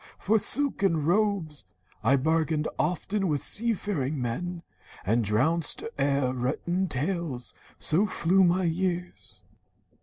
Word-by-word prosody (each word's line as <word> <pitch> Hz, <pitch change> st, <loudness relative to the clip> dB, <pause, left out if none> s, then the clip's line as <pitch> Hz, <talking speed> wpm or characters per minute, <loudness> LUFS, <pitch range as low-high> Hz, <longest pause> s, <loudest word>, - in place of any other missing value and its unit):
For 220 Hz, +2 st, +2 dB
silken 195 Hz, -, +3 dB
robes 185 Hz, -5 st, 0 dB, 0.4 s
I 130 Hz, +5 st, +4 dB
bargained 155 Hz, +2 st, 0 dB
often 190 Hz, +5 st, -1 dB
with 150 Hz, -4 st, -1 dB
sea 230 Hz, +1 st, 0 dB
faring 155 Hz, -9 st, -3 dB
men, 170 Hz, +9 st, -4 dB, 0.4 s
And 115 Hz, +4 st, +2 dB
drowsed 145 Hz, +11 st, +1 dB, 0.2 s
o'er 140 Hz, -2 st, +1 dB
written 165 Hz, +9 st, -1 dB
tales. 150 Hz, -3 st, -3 dB, 0.2 s
So 185 Hz, +7 st, +3 dB
flew 190 Hz, 0 st, +2 dB
my 180 Hz, +1 st, +2 dB
years. 175 Hz, +1 st, -3 dB
165 Hz, 115 wpm, -27 LUFS, 140-190 Hz, 0.4 s, I